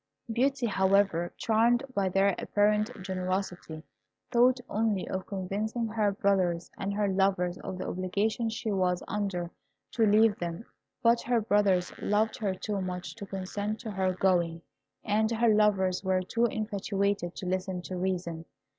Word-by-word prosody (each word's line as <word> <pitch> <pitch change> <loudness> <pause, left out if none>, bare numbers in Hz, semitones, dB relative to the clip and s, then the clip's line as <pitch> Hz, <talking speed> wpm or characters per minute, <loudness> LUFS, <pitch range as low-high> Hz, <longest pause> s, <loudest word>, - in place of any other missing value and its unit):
Beauty, 265 +2 +1
however, 195 -4 +2
charmed 235 +3 +3
by 195 -4 +1
their 195 +1 +3
apparent 210 +1 +2
generosity, 185 -3 -3 0.5
thought 250 +1 +4
only 210 -2 0
of 190 0 -4
convincing 210 +4 -2
her 215 -2 +1
brothers 190 -4 0
and 195 - -3
her 205 0 +1
lovers 190 -2 +1
of 185 - -6
the 185 - -4
obligation 205 +6 -1
she 220 0 -3
was 180 -2 +1
under 195 -4 -2 0.4
to 230 - +1
leave 215 0 +4
them; 170 +5 -4 0.4
but 235 0 +4
her 240 -1 +1
brothers 205 -4 +2
loved 215 +2 +1
her 200 -4 -1
too 200 +1 -3
much 180 -1 -4
to 205 -3 -9
consent 200 +3 -4
to 225 -3 -5
her 190 -2 0
going, 175 -3 +1 0.4
and 220 +1 +1
her 230 +1 +3
lovers 195 -3 +2
were 185 -1 +1
too 230 +6 +1
infatuated 200 -4 -1
to - - -6
listen 185 0 -2
to 185 - -6
reason. 175 -3 -2
200 Hz, 150 wpm, -29 LUFS, 185-215 Hz, 0.5 s, thought